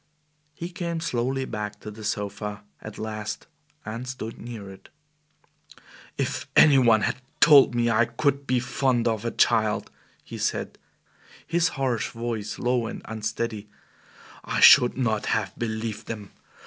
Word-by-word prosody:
He 170 +2 -6
came 170 -2 -4
slowly 130 -3 -1
back 105 -2 -5
to 105 - -7
the 110 +1 -11
sofa, 105 -1 -4 0.2
at 110 - -9
last, 110 0 -5 0.4
and 115 +4 -5
stood 120 -3 -6
near 115 -4 -8
it. 95 - -15 1.3
"If - - -2
any 140 -3 +7
one 115 -4 +5
had - - 0 0.2
told 140 -5 +7
me 120 0 +2
I 115 +1 +4
could 140 +4 -1
be 130 -1 +2
fond 125 -1 0
of 110 -1 -1
a - - +1
child," 110 -3 +1 0.3
he - - -9
said, - - -2 0.7
his 170 0 +2
harsh 130 -4 0
voice 115 -3 -4
low 120 -2 0
and - - -7
unsteady, 110 -1 -4 0.7
"I - - -2
should 125 0 +8
not 110 -5 0
have 95 -3 0
believed 110 -1 -4
them. 105 -4 -7
115 Hz, 145 wpm, -25 LUFS, 110-130 Hz, 1.3 s, should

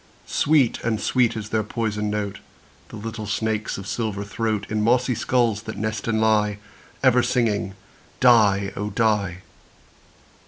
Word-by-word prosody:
Sweet 145 -5 +2
and 115 -2 0
sweet 120 0 +1
is 110 0 -6
their 110 0 +1
poisoned 105 -1 -2
note, 105 -1 -3 0.5
The - - -10
little 110 0 -6
snakes' 110 +1 -2
of 100 - -7
silver 105 -1 -3
throat, 105 0 -2
In 110 0 -1
mossy 125 +3 +2
skulls 115 -3 +1
that 110 -1 -7
nest 110 0 -3
and 110 -1 +1
lie, 105 -2 +2 0.5
Ever 125 -2 +5
singing 115 -5 0 0.4
"die, 105 -6 +4
oh! 105 +1 -3
die." 105 -6 0
110 Hz, 145 wpm, -23 LUFS, 105-115 Hz, 0.5 s, Ever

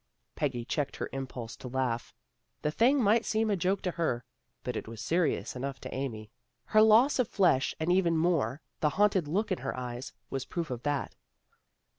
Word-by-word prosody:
Peggy 130 -5 -1
checked 145 +1 -2
her - - -4
impulse 125 -4 -5
to - - -8
laugh. 125 -2 -2 0.5
The 150 - +1
thing 255 - +4
might 220 +3 +4
seem 220 0 +1
a - - +3
joke 190 +2 0
to 180 - 0
her, 130 -9 -1 0.4
but 125 - -3
it - - -4
was 115 -1 -8
seri 170 +6 +2
ous - - -7
enough 135 +1 -4
to - - -7
Amy. 110 -6 -4 0.3
Her 215 - +5
loss 225 +6 +6
of 250 - +3
flesh, 180 -12 +2
and 160 +2 +1
even 175 -3 +3
more 160 -6 +1 0.2
the 150 - +3
haunted 200 -5 +3
look 200 +7 0
in 185 - 0
her - - -4
eyes, 125 0 -5 0.2
was 135 -1 -2
proof 165 +2 -4
of 120 -2 -4
that. 145 0 -2
150 Hz, 195 wpm, -30 LUFS, 125-190 Hz, 0.5 s, loss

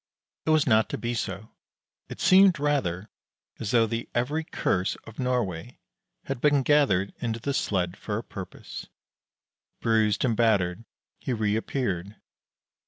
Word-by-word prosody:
It - - +2
was 155 -2 +4
not 110 -3 +3
to - - -3
be 120 0 -2
so; 105 -1 -4 0.6
it - - -8
seemed 190 -3 +6
rather 105 -10 -1 0.5
as 110 - -3
though 115 -1 +4
the 115 +1 -4
every 145 +7 0
curse 95 -9 -1
of 115 - -13
Norway 125 -5 -2 0.5
had 135 -3 -4
been 145 -2 +4
gathered 130 -10 +3
into 115 -1 -2
the 140 +5 -2
sled 90 -8 0
for - - -3
a - - -4
purpose. - - -8 0.9
Bruised 110 -2 +2
and 115 -3 +1
battered, 105 -3 +2 0.3
he 130 - -2
reappeared. 105 -3 -1
115 Hz, 140 wpm, -27 LUFS, 100-135 Hz, 0.9 s, seemed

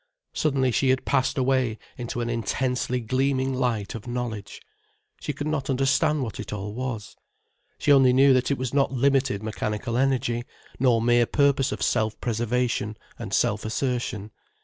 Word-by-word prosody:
Suddenly 135 -4 +1
she 130 +3 +2
had 130 0 +1
passed 130 +2 +1
away 130 -3 +1 0.2
into 120 0 -4
an 120 - -2
intensely 125 +2 -1
gleaming 130 +2 0
light 120 -6 -1
of 115 0 -8
knowledge. 120 -4 -4 0.6
She - - -3
could 145 +1 -5
not 150 -3 -2
understand 140 +3 +2
what 115 - -6
it - - -6
all 105 0 -5
was. 115 -3 -5 0.6
She 145 - +2
only 135 -2 +6
knew 135 +2 +6
that 130 -1 +2
it 140 - +1
was 130 0 -3
not 140 -1 +2
limited 135 -4 +1
mechanical 110 +2 -3
energy, 125 -3 +1 0.4
nor 120 -3 +3
mere 120 0 +4
purpose 140 -2 +2
of - - -3
self 110 -2 0
preservation 115 -2 -1 0.2
and - - -6
self 105 +1 +1
assertion. 110 -3 -2
125 Hz, 160 wpm, -25 LUFS, 115-135 Hz, 0.6 s, only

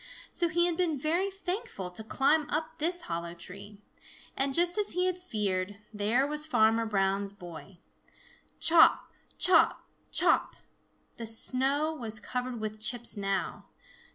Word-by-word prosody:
So 345 - +1
he 345 +2 +2
had 350 -1 0
been 335 -5 0
very 335 +8 0
thankful 380 - -5
to 200 +5 -7
climb 290 +6 +1
up 310 +2 -3
this 345 +3 0
hollow 170 0 -5
tree. 200 +4 -10 0.6
And, 270 +1 0
just 345 +5 +3
as 415 - +1
he 360 +1 +1
had 370 -1 +1
feared, 205 - -2 0.2
there 215 +6 +1
was 300 +1 -2
Farmer 225 -4 +3
Brown's 195 -1 0
boy. 175 0 -11 0.8
Chop, 330 -1 +5 0.3
chop, 370 - +4 0.3
chop! - - +3 0.6
The 230 - -6
snow 270 +7 +1
was 225 -7 -1
covered 250 +1 -4
with 215 0 -5
chips 235 +2 -2
now. 195 -2 -3
250 Hz, 140 wpm, -29 LUFS, 205-320 Hz, 0.8 s, Chop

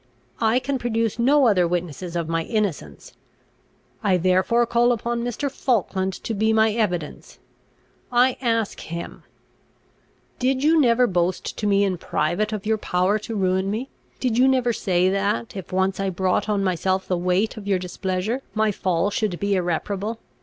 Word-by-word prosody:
I 225 +1 +3
can 265 +1 -1
produce 230 -1 -1
no 275 +3 +4
other 185 -6 +4
witnesses 175 0 -4
of 170 -2 -1
my 165 0 0
innocence; 210 -8 -3 0.9
I 195 -4 +2
therefore 185 +7 +2
call 235 +1 +3
upon 235 0 -2
Mr. 245 +4 -2
Falkland 195 -8 -1
to 225 - -3
be 220 +1 +1
my 220 0 +3
evidence. 180 -9 -3 0.7
I 250 +1 +4
ask 230 -4 0
him 170 +1 -7 1.2
"Did 260 +1 +1
you 315 +1 +5
never 245 -1 +4
boast 180 -3 -1
to 210 - -2
me 200 0 +3
in 185 -3 -1
private 175 +10 -1
of 215 -2 -4
your 220 0 +1
power 185 +2 +1
to 220 +2 -6
ruin 190 -1 +1
me? 230 +6 -3 0.3
Did 245 -2 0
you 260 - +6
never 255 -3 +2
say 185 -4 +1
that, 195 - -1
if 190 -4 -7
once 190 +1 0
I 195 0 0
brought 185 +3 0
on 205 -2 +1
myself 185 +1 0
the 185 - +1
weight 180 +4 0
of 210 -3 -9
your 195 -2 +2
displeasure, 185 +6 -3
my 215 0 +2
fall 185 0 0
should 200 -4 -1
be 200 0 0
irreparable? 195 +4 -2
205 Hz, 165 wpm, -23 LUFS, 185-235 Hz, 1.2 s, you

